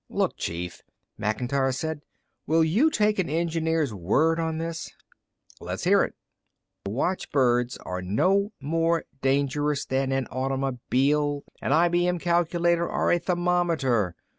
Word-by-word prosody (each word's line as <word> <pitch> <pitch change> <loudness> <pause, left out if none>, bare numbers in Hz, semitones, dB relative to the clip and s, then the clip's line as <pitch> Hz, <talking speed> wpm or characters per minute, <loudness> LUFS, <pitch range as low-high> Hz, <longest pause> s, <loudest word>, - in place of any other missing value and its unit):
"Look, - - 0
Chief," 85 +1 -5 0.4
Macintyre 125 +5 0
said. 155 +3 -3 0.5
"Will 160 +1 +4
you 210 - +3
take 210 -7 +1
an 185 - 0
engineer's 160 -3 0
word 150 - +1
on 160 -1 -1
this?" 165 0 -4 0.7
"Let's - - -5
hear - - +5
it." - - -4 0.7
"The - - -2
watchbirds 125 - 0
are 90 0 -5
no 190 - +1
more 165 +3 0 0.2
dangerous 140 +2 +1
than 135 0 -1
an 135 -1 0
automobile, 135 +2 0 0.2
an - - -2
IBM 175 +2 +3
calculator 170 0 +1
or - - +1
a 175 - +3
thermometer. 170 - +1
150 Hz, 125 wpm, -26 LUFS, 130-170 Hz, 0.7 s, hear